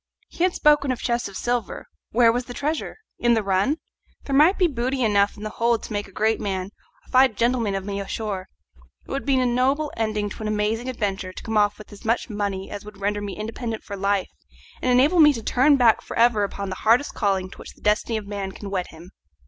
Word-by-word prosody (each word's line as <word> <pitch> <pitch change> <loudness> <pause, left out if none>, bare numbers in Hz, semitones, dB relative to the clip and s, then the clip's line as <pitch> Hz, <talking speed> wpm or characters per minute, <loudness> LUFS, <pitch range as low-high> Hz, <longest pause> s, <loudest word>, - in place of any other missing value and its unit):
He 345 - -3
had 365 - 0
spoken 295 -2 +4
of 255 - -2
chests 240 -1 -1
of 195 - -8
silver 240 -2 -2 0.2
where 230 0 +5
was 245 +1 -2
the 245 - -9
treasure? 300 +2 -3 0.2
in 240 0 +3
the 220 - 0
run? 195 +10 +1 0.5
There 275 - -2
might 315 +7 +5
be 370 - +4
booty 260 -3 -1
enough 205 -2 +2
in 205 - -9
the 215 - -4
hold 235 0 +1
to - - -6
make 205 0 -2
a - - -16
great 220 +3 +1
man, 195 -2 -3 0.4
a - - -19
fine 255 -3 +5
gentleman 230 -3 +1
of 195 -1 -4
me 200 -1 -3
ashore. 200 -2 -4 0.6
It - - -10
would 275 +1 -3
be 270 -2 +3
a 255 - +2
noble 265 +5 +1
ending 215 -2 -1
to - - -9
an 215 - -3
amazing 215 +3 -1
adventure 200 -6 -3
to - - -10
come 225 - -4
off 205 -1 +3
with 215 - -13
as 200 - -13
much 230 +1 0
money 200 -2 -3
as 205 -1 -6
would 210 -1 -12
render 205 +1 -1
me 200 -1 -5
independent 225 +1 -5
for 200 - -6
life, 200 -1 0 0.5
and 255 - +1
enable 280 +8 +4
me 300 -2 +8
to 230 - -6
turn 265 +7 +4
my - - +4
back 235 -3 +4
for - - -7
ever 230 -3 +4
upon 200 0 -4
the 185 - -4
hardest 235 +6 +3
calling 190 -3 0
to - - -13
which - - -11
the - - -23
destiny 215 +2 +1
of 215 - -6
man 200 -1 -4
can 200 -2 -8
wed 185 -2 -1
him. 170 +3 -14
220 Hz, 245 wpm, -23 LUFS, 200-250 Hz, 0.6 s, me